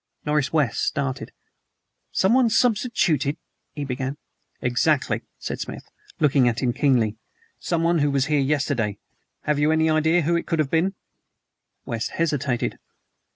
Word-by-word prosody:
Norris 150 -2 +1
West 150 -7 +1
started. 135 -3 -2 0.8
"Someone 235 +5 +3
substituted 215 - +1 0.2
" - - -52
he 145 -1 -3
began. 130 +1 -3 0.4
"Exactly," 130 +4 +1 0.2
said - - -5
Smith, - - -6 0.4
looking 140 -4 +4
at 120 0 0
him 120 -2 +1
keenly; 120 -6 +2 0.4
"someone 170 0 +1
who 145 0 +2
was 140 -1 +1
here 150 0 +1
yesterday. 135 -7 0 0.4
Have 150 -1 0
you 150 +1 +3
any 160 0 +3
idea 160 +2 +3
whom 170 +3 +2
it - - -4
could 165 - 0
have 150 -3 0
been?" 180 +4 +1 0.9
West 115 -1 -3
hesitated. 140 -7 -1
150 Hz, 140 wpm, -24 LUFS, 130-160 Hz, 0.9 s, looking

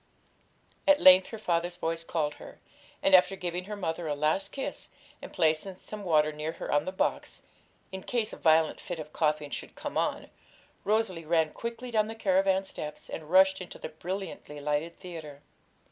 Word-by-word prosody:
At 290 0 +6
length 185 0 +8
her 225 - -7
father's 175 -3 -1
voice 165 -1 -2
called 155 -3 -1
her, - - -11 0.4
and 195 - +4
after 185 +1 +6
giving 180 -1 -4
her 210 +1 -5
mother 170 -4 -3
a 145 - -1
last 155 +6 0
kiss, 270 - -5 0.3
and - - -9
placing 160 +4 +1
some 210 +2 -8
water 155 -4 +3
near 155 +2 -4
her - - -6
on 145 +1 +2
the 185 - -2
box, 190 - -2 0.5
in 190 0 -5
case 230 -1 -1
a - - -7
violent 160 -1 +3
fit 175 - -5
of 155 -1 -8
coughing 150 -2 0
should - - -6
come - - -3
on, - - -2 0.5
Rosalie 205 -5 0
ran 160 -1 +2
quickly 235 +1 -6
down 215 -2 +2
the 225 - -6
caravan 190 -2 +2
steps, 150 -5 -7
and 155 -1 -6
rushed 190 +1 +5
into 180 - -8
the - - -6
brilliantly 170 -2 -6
lighted 150 +3 -2
theatre. 155 -6 -9
175 Hz, 180 wpm, -29 LUFS, 155-195 Hz, 0.5 s, length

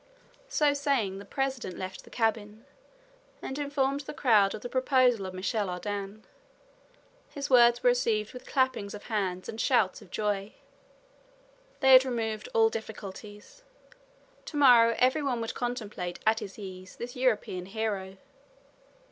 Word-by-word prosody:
So 300 -12 +2
saying, 270 -9 0
the 200 - -10
president 265 -4 -3
left 185 0 -7
the - - -15
cabin 220 0 -2 0.7
and 265 +2 -6
informed 280 -1 0
the 290 +1 -8
crowd 215 -8 +3
of 215 - -9
the - - -3
proposal 255 -5 +2
of 185 - -8
Michel 200 +2 -1
Ardan. 200 +3 -5 1.1
His 280 -1 -6
words 240 -1 +6
were 245 - +6
received 225 -4 0
with 250 - -11
clappings 255 -7 0
of 205 - -10
hands 185 -3 -2
and 225 - -4
shouts 220 -8 +2
of 200 - -15
joy. 205 0 -2 1.3
They 265 -1 +6
had 255 0 +9
removed 225 -4 -3
all 225 0 +5
difficulties. 210 - -9 0.8
To 300 - -6
morrow 235 -5 +6
every 260 +4 +3
one 265 -4 -1
would 225 -1 -4
contemplate 215 -8 -4
at 220 0 +3
his 205 -4 -8
ease 185 -2 -9
this 245 +1 -7
European 210 -8 -1
hero. 195 -2 -3
225 Hz, 145 wpm, -28 LUFS, 200-255 Hz, 1.3 s, had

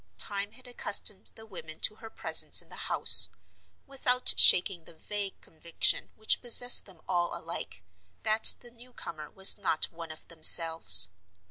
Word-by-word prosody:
Time 200 +1 -2
had 255 - -20
accustomed 205 -4 -2
the 220 - -15
women 160 -7 -14
to 215 - -3
her 225 - -15
presence - - -1
in - - -8
the - - -11
house, - - +4 0.6
without 255 -2 0
shaking 180 -2 +2
the - - -16
vague 200 +4 -8
conviction 165 +1 -4
which 220 - -4
possessed 245 +1 +5
them 180 -5 -19
all 175 -1 -5
alike, 160 - -12 0.4
that 220 0 +4
the 240 - -17
newcomer 230 -11 -14
was 190 +1 0
not 180 -5 -4
one 165 -1 -13
of 155 - -15
themselves. 160 - +4
190 Hz, 150 wpm, -25 LUFS, 165-220 Hz, 0.6 s, possessed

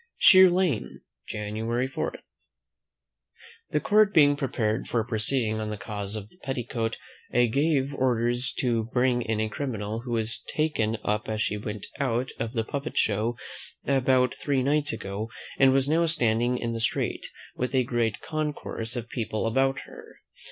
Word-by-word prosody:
Sheer 185 -1 +8
Lane, 175 - 0 0.3
January 110 +4 -2
4. 130 - -3 1.5
The 150 - +1
court 210 +3 +4
being 145 -2 +6
prepared 115 -6 -1
for 115 -2 0
proceeding 110 0 0
on 110 0 -3
the 105 - -4
cause 100 0 -5
of 105 -1 -6
the - - -22
petticoat, 120 -5 -3 0.3
I 120 0 +4
gave 140 +2 +1
orders 120 -1 +1
to 115 -3 +1
bring 125 +1 +1
in 110 -2 -1
a 110 - +1
criminal, 110 -3 -3
who 120 0 -5
was 115 0 -1
taken 115 -8 0
up 105 +1 -1
as 110 0 -2
she 105 - -1
went 105 0 -5
out 130 -2 0
of 115 +1 -3
the 115 -3 0
puppet 140 +6 -5
show 110 +3 +1 0.5
about 130 -2 +3
three 135 -3 0
nights 145 +2 +2
ago, 100 0 -4 0.3
and 135 -1 +7
was 135 0 +2
now 165 +3 +3
standing 120 -5 +1
in 115 -1 -2
the 115 - -3
street, 110 - -1 0.3
with 125 +2 -2
a 130 - +4
great 115 -3 -1
concourse 150 -7 -3
of 120 -1 -4
people 115 -3 -3
about 135 +4 +1
her. - - -13
120 Hz, 160 wpm, -27 LUFS, 110-135 Hz, 1.5 s, Sheer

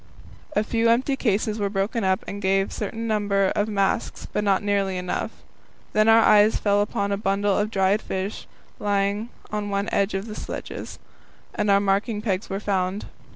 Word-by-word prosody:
A 210 - +3
few 230 +1 +1
empty 255 +4 +2
cases 215 -3 0
were 200 -1 0
broken 200 +3 -1
up 190 0 +1
and 205 - -5
gave 195 0 +2
a - - -9
certain 225 +2 -4
number 205 -3 +1
of 205 - +1
marks, 200 -2 -1
but 210 - 0
not 200 -1 +2
nearly 200 -2 0
enough. 180 0 -2 0.6
Then 215 +1 +4
our 225 0 +7
eyes 210 +1 +5
fell 205 -1 +2
upon 200 -1 -1
a 200 - +1
bundle 200 0 +1
of 210 +1 0
dried 195 0 +2
fish 190 +2 -4 0.3
lying 205 +2 0 0.2
on 210 -1 -2
one 200 0 -1
of 195 0 0
the 220 - -7
sledges, - - -6 0.6
and 210 0 -1
our 200 0 +6
marking 200 +2 0
pegs 200 -2 -2
were 195 - -2
found. 195 -1 -1
205 Hz, 180 wpm, -24 LUFS, 195-215 Hz, 0.6 s, our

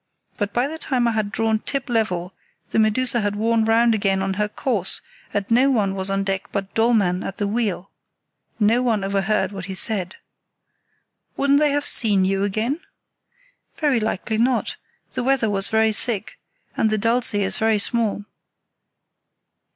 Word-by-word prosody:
But 205 -1 -2
by 245 +5 +1
the 320 +2 -6
time 250 -5 0
I - - +2
had 215 -2 -1
drawn 220 0 0
up 275 - -2
level 190 -7 -1 0.4
the - - +2
Medusa 235 +2 +3
had 205 0 -1
worn 225 +1 +1
round 230 +1 +4
again 195 -2 +1
on 195 0 -1
her 210 +2 0
course, 210 -4 -1 0.3
and 205 -1 -1
no 255 +4 +5
one 210 -7 +1
was 190 0 -2
on 195 0 0
deck 195 -1 -2
but 195 -1 -4
Dollmann 215 -6 +2
at 195 - -6
the 205 -3 -1
wheel. 205 -3 -2 0.7
No 225 +3 +3
one 225 -5 0
overheard 195 +2 0
what 195 -3 -6
he 190 -1 -6
said." 190 -3 -2 1.2
"Wouldn't 280 +1 +3
they 300 0 +3
have 290 0 0
seen 205 -5 +3
you 195 +1 0
again?" 220 - -1 1.0
"Very 290 -6 +2
likely 220 0 -2
not; 245 +1 +1 0.4
the - - -3
weather 255 -4 +1
was 195 -1 +1
very 220 0 +2
thick, 225 - -4 0.4
and 220 - +2
the 215 - +1
Dulce 230 +1 +1
is 200 -1 0
very 220 -1 +2
small." 210 -1 -1
215 Hz, 165 wpm, -22 LUFS, 195-235 Hz, 1.2 s, no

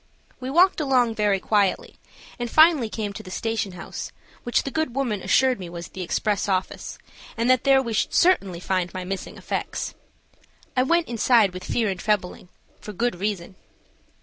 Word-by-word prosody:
We 255 0 -5
walked 345 +4 +4
along 255 -5 +2
very 210 -3 +1
quietly 200 -1 0 0.4
and 240 0 -3
finally 310 -5 +5
came 210 -2 -4
to 215 - -7
the 195 - -11
station 225 -1 -2
house, 175 - -7 0.3
which 240 - 0
the 275 - -4
good 315 -5 -2
woman 240 -8 -1
assured 260 +2 +3
me 180 -2 -7
was 170 0 -8
the 190 - -8
express 205 +3 -1
office, 185 -1 -2 0.4
and 230 +1 0
that 255 +1 +2
there 270 -1 +5
we 230 -2 -4
should 215 - 0
certainly 200 - +2
find 180 -1 -1
my 185 - -3
missing 190 +1 -5
effects. - - -4 0.8
I 255 - +3
went 335 +6 +2
inside 230 -4 +3
with 185 0 -7
fear 230 -2 0
and 185 - -5
trembling, 185 -4 -2 0.3
for 210 - -8
good 230 -2 -1
reason. 190 -2 -3
215 Hz, 175 wpm, -24 LUFS, 190-255 Hz, 0.8 s, finally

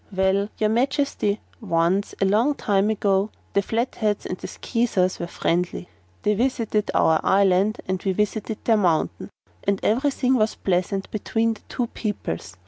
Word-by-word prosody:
"Well, 190 +1 +1
your 215 0 +1
Majesty, 255 -4 0 0.2
once 185 -1 0
a 195 - +3
long 225 +9 +3
time 200 -3 +1
ago 200 -1 +1 0.2
the 200 - +3
Flatheads 220 -1 -1
and - - -3
the - - -8
Skeezers 215 -7 0
were 170 - -3
friendly. 175 +1 -1 0.3
They 210 - +3
visited 225 -2 0
our 160 -1 +4
island 195 +2 +3
and 185 0 -1
we 195 - 0
visited 210 +2 -1
their 225 -2 +4
mountain, 175 -3 0 0.3
and 200 -1 +1
everything 260 +2 +2
was 220 -3 +2
pleasant 190 +1 -1
between 225 +2 0
the 220 - -14
two 245 - -1
peoples. 200 - -5
205 Hz, 150 wpm, -23 LUFS, 190-225 Hz, 0.3 s, our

